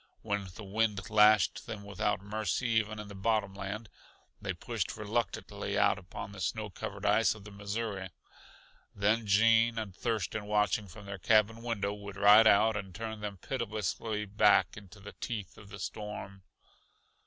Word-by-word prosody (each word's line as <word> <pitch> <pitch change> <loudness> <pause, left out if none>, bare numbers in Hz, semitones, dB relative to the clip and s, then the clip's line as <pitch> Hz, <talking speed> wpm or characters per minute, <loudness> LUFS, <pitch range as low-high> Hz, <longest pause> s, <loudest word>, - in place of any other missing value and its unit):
When 100 -1 -1
the 110 - -8
wind 105 0 -1
lashed 105 -1 +5
them 105 -2 -6
without 100 -1 -1
mercy 110 +3 -1
even 110 -1 +1
in 105 -1 -7
the 100 - -9
bottom 100 0 0
land, 100 +3 -5 0.5
they - - -2
pushed - - -3
reluctantly - - -2
out - - +3
upon 95 +1 -8
the 100 -2 -9
snow 105 +3 -2
covered 100 +2 -6
ice 105 0 +4
of 105 - -12
the 105 - -11
Missouri. 100 -1 -4 0.9
Then 105 +2 +1
Gene 115 +2 +4
and 105 -5 -4
Thurston 110 -2 -2
watching 105 -1 +1
from 100 +3 -12
their 100 -1 -6
cabin 110 +4 +3
window 105 -4 -2
would 100 -1 -8
ride 105 +3 +7
out 110 +1 +5
and 95 -3 -5
turn 110 0 -5
them 105 -2 -5
pitilessly 110 -1 -3
back 105 -3 +4
into 105 0 -12
the 105 0 -10
teeth 105 -6 -4
of 100 - -14
the - - -8
storm. 105 -2 -6
105 Hz, 165 wpm, -31 LUFS, 100-110 Hz, 0.9 s, ride